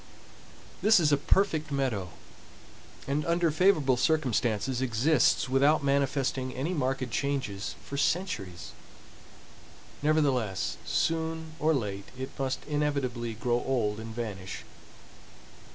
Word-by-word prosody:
This 220 -1 +6
is 155 -3 +3
a - - +6
perfect 155 0 +1
meadow, 125 -10 -1 1.0
and 145 +2 0
under 170 -1 +2
favorable 155 -6 +3
circumstances 125 -4 +1
exists 130 +6 +3
without 140 +4 +3
manifesting 135 -2 0
any 145 +8 -2
marked 130 -5 -1
changes 125 -9 -2
for 140 - -5
centuries. 100 - -1 1.3
Nevertheless, 140 -10 +1
soon 160 0 -1
or 155 +1 +3
late 100 -6 -3
it 130 +1 -5
must 135 -1 -2
inevitably 135 -6 -1
grow 120 +2 0
old 110 -5 0
and 110 0 -7
vanish. 105 -5 -5
135 Hz, 105 wpm, -29 LUFS, 120-155 Hz, 1.3 s, This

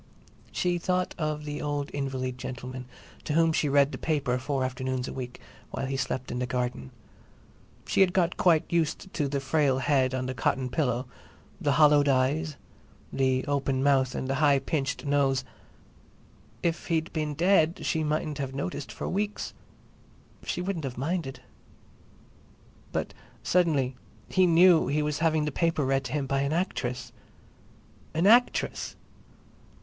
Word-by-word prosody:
She 175 -1 0
thought 180 +1 0
of 155 -1 -2
the 145 0 -4
old 145 -1 -2
invalid 130 -2 -3
gentleman 125 0 -6 0.4
to 150 - -2
whom 165 0 +4
she 155 -2 +1
read 140 0 +4
the - - -6
newspaper 140 -5 0
four 135 0 -1
afternoons 130 0 -2
a - - -5
week 125 -1 -6 0.3
while - - -3
he 135 +1 -2
slept 130 -1 -3
in 125 - -3
the 125 - -1
garden. 125 - -2 1.0
She - - +2
had 190 -2 +5
got 180 -1 +1
quite 165 -4 +3
used 170 +2 -1
to 150 -4 0
the 140 0 -1
frail 135 -1 +2
head 130 -1 +2
on 130 0 -2
the 130 - -3
cotton 130 +1 0
pillow, 125 -2 0 0.6
the 145 -4 +2
hollowed 150 -1 +5
eyes, 140 +4 +1 0.6
the 130 -1 +1
open 135 -2 0
mouth 135 -2 +3
and 130 - -3
the 135 - 0
high 145 -2 +5
pinched 135 0 -2
nose. 140 -2 +2 1.2
If 170 -1 -1
he'd 165 -1 -1
been 150 -2 -2
dead 170 0 +3
she 160 -1 0
mightn't 150 -1 -1
have 135 -1 -3
noticed 145 +6 -4
for - - -5
weeks; 205 +2 -2 0.9
she - - -2
wouldn't 180 -4 -3
have 125 -3 -5
minded. 140 -1 -3 1.5
But - - -2 0.3
suddenly 150 -8 +2 0.3
he 185 -1 +4
knew 170 -2 +6
he 150 +3 +1
was 150 -1 -1
having 155 -1 +2
the 150 - -1
paper 165 -1 +1
read 135 0 +1
to 130 - -5
him 145 -2 0
by 135 +1 0
an 140 +2 0
actress! 125 -9 -2 1.0
"An 165 +3 +2
actress!" 240 +4 +3
145 Hz, 155 wpm, -28 LUFS, 130-160 Hz, 1.5 s, knew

